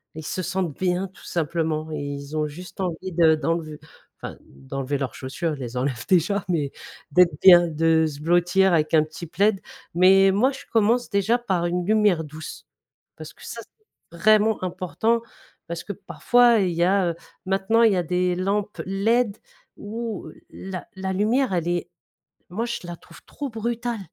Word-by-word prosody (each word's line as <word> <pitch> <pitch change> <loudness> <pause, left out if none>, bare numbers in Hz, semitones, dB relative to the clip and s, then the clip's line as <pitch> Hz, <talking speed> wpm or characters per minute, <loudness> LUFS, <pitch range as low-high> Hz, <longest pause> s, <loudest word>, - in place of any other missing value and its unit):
ils 160 -1 -8
se 185 - -3
sentent 185 -2 -2
bien 185 0 0
tout 185 - -19
simplement 160 -1 -2
et 155 - -3
ils 140 +1 -6
ont 155 -1 0
juste 180 +7 -11
envie 185 +1 -3
de 165 -2 +4
d'enlever, 155 -1 -3 0.4
enfin - - -7
d'enlever 130 - -5
leurs 135 -4 -4
chaussures, 155 +5 -4
ils - - -12
les 125 -1 -6
enlèvent 125 -2 -2
déjà 190 +3 +2
mais 150 -6 0 0.4
d'être 170 -1 +4
bien, 175 -2 +8
de 160 0 +2
se 145 -2 -7
blottir 175 +3 +3
avec 155 0 +2
un 155 - +5
petit 160 +2 -9
plaid. 200 +4 +1 0.3
Mais 190 +2 +6
moi, 240 +8 +2
je 270 - -10
commence 230 +3 +2
déjà 205 +4 +2
par 190 -8 -1
une 175 0 -2
lumière 210 -5 +3
douce 155 +1 -9 0.5
parce - - -10
que - - -15
ça - - -7
c'est 430 - -20
vraiment 215 0 +3
important 185 +6 -1 0.5
parce 170 0 -5
que 205 - -4
parfois 240 +3 +3
il 180 -3 +1
y 170 - +1
a, 185 -1 +2
heu, - - -8 0.3
maintenant 195 +4 +2
il 225 -3 +5
y - - +1
a 180 - +1
des 180 +1 0
lampes 200 +3 -2
LED 215 +3 +1 0.4
où 220 -3 -6 0.2
la 185 -2 -7
la 190 0 -3
lumière 220 +5 +1
elle 170 -2 -1
est 175 -1 -2 0.6
moi 215 +7 -3
je 235 - -3
la 175 - -6
trouve - - -17
trop 285 -2 -6
brutale, 235 0 -3
180 Hz, 180 wpm, -23 LUFS, 160-205 Hz, 0.6 s, bien